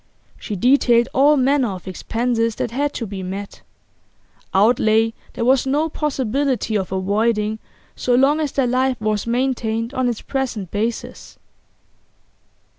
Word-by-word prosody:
She 210 - -5
detailed 240 +2 +3
all 290 +3 +5
manner 265 -2 +2
of 185 0 -10
expenses 230 +4 -1
that - - -3
had 285 +4 -1
to 230 - -4
be 195 -2 -6
met 195 +2 -6 0.9
outlay 220 +2 +3 0.2
there 230 - -2
was 265 +1 +3
no 295 +4 +1
possibility 270 -5 -1
of 190 -3 -1
avoiding 210 +3 0 0.4
so 245 - +1
long 275 +4 +3
as 300 -3 -1
their 270 - +1
life 255 +1 +1
was 215 0 -1
maintained 235 -1 -1
on 255 -2 0
its 235 - -4
present 245 -9 -3
basis. 220 +3 -4
235 Hz, 135 wpm, -20 LUFS, 215-265 Hz, 0.9 s, all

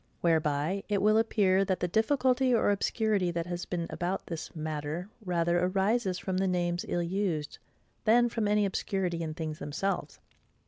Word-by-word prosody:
Whereby 160 +2 +1
it 205 -1 +2
will 215 +2 +4
appear, 195 -4 +3
that 190 -1 -1
the 180 - 0
difficulty 255 +5 +2
or 220 - +3
obscurity 205 -2 +1
that 170 -1 -2
has 175 0 -4
been 170 -2 -3
about 180 +2 -2
this 165 0 -6
matter 155 +2 -4 0.2
rather 175 -1 +1
rises 195 +1 +1
from 185 -1 -3
the 190 +1 +1
names 175 -1 0
ill 175 - 0
used, 170 -4 -2 0.4
than 240 +2 +5
from 230 -2 -1
any 210 0 +3
obscurity 190 -3 -1
in 155 -1 -4
things 155 -1 -4
themselves. 195 +7 -3
185 Hz, 165 wpm, -29 LUFS, 170-205 Hz, 0.4 s, than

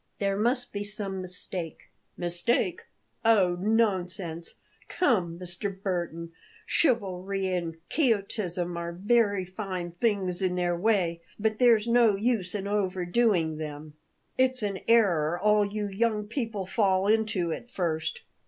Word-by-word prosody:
"There 195 -1 0
must 240 +5 0
be 205 0 -2
some 205 -2 -4
mistake." 180 -2 -5 0.4
"Mistake? 175 - +1 0.4
Oh, 200 -6 +4
nonsense! 185 -6 0 0.3
Come, 185 - +1
Mr. 185 +2 -4
Burton, 170 -3 -3 0.3
chivalry 195 - 0
and 170 -2 -2
quixotism 200 - 0
are 170 0 -4
very 205 0 +2
fine 185 -2 -5
things 190 -1 -1
in 185 -1 +1
their 175 -1 0
way; 175 -3 +1 0.2
but 215 0 -1
there's 230 -4 +5
no 235 -3 +4
use 210 -3 0
in 200 -1 -3
overdoing 185 -3 +1
them. 150 0 -7 0.5
It's 255 -2 +2
an 200 -2 -2
error 175 -8 +3
all 210 +1 +4
you 205 +1 -2
young 210 +1 0
people 220 -4 -3
fall 190 -1 +2
into 210 -6 +1
at 240 - -8
first. 160 -5 -2
195 Hz, 125 wpm, -28 LUFS, 175-220 Hz, 0.5 s, there's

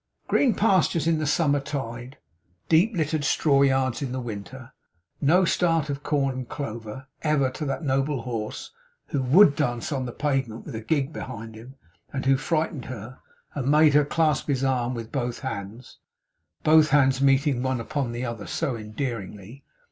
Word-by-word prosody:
Green 250 -6 +3
pastures 185 -6 +2
in 165 -1 +2
the 155 - -1
summer 145 -1 +2
tide, 130 -3 -6 0.5
deep 185 +8 +4
littered 155 -1 0
straw 140 0 +3
yards 130 -2 +2
in 135 -3 -3
the 130 - -2
winter, 120 +3 -8 0.5
no 175 +6 +4
start 165 -4 +1
of 140 0 -5
corn 140 -3 0
and 130 -2 -6
clover, 115 -1 -6 0.2
ever, 145 -4 +1
to 150 +4 -5
that 135 +4 -3
noble 135 -2 0
horse 115 -3 -5 0.4
who 140 - -1
WOULD 145 +4 +6
dance 120 -4 -1
on 130 -3 -2
the - - -5
pavement 135 -5 -2
with - - -8
a 110 - -5
gig 140 +4 -1
behind 115 -5 -7
him, 120 +5 -12 0.4
and 135 -1 -4
who 135 0 +5
frightened 155 0 -1
her, 125 +1 -8 0.3
and 135 -2 -2
made 150 0 +5
her 150 0 +5
clasp 155 0 +1
his 135 -2 0
arm 125 -2 0
with 115 -1 -7
both 120 -3 -3
hands 115 -2 -7 0.6
(both 155 0 +5
hands 135 -2 +3
meeting 135 -1 +3
one 130 -1 -1
upon 130 +1 -3
the 120 +1 -4
another 115 -4 -5
so 130 - -2
endearingly!) 110 0 -6
135 Hz, 170 wpm, -25 LUFS, 120-150 Hz, 0.6 s, WOULD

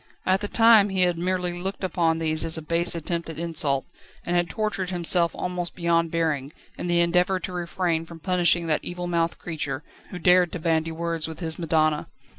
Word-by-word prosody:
At 190 +1 +2
the 205 - -1
time 225 -2 +6
he 190 -1 0
had 175 -2 +2
merely 180 0 -1
looked 190 +3 -5
upon 165 -3 +1
these 155 -1 +2
as 165 0 +1
a 160 - -6
base 170 +2 -1
attempt 170 +1 -3
at 160 - -7
insult, 155 -5 -1 0.4
and 175 - -1
had 175 -1 +1
tortured 195 -3 -2
himself 175 -1 +2
almost 180 -1 -4
beyond 170 -1 +1
bearing, 155 -4 -1 0.2
in - - -5
the 175 0 +3
endeavour 180 +2 +2
to 180 +1 -6
refrain 170 -2 -1
from 165 -1 -11
punishing 175 -1 +2
that 155 -2 0
evilmouthed 175 -1 -2
creature, 145 -4 -4 0.3
who 180 - -7
dared 180 0 +4
to 180 - -4
bandy 160 0 0
words 165 0 -2
with 160 - -8
his 160 -2 -3
madonna. 155 -2 +1
170 Hz, 195 wpm, -25 LUFS, 160-180 Hz, 0.4 s, time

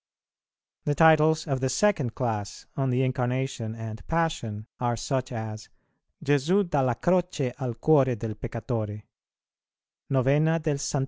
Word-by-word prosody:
The 145 - +1
titles 160 0 +5
of 135 -3 -1
the 130 0 0
second 145 - +1
class 105 -5 -3
on 135 -1 0
the 125 +1 +2
Incarnation 125 -2 -2
and 110 -1 -7
Passion 160 -11 -1
are 120 -1 0
such 130 +1 -2
as 110 -2 -6 0.6
"Gesu 160 +8 +3
dalla 135 -7 +1
Croce 175 -6 0
al 125 -4 -3
cuore 135 -5 +4
del 110 +1 -4
peccatore;" 110 -2 -4 1.1
"Novena 140 +5 +3
del 155 -3 -1
Ss. 145 - -2
130 Hz, 130 wpm, -26 LUFS, 115-155 Hz, 1.1 s, titles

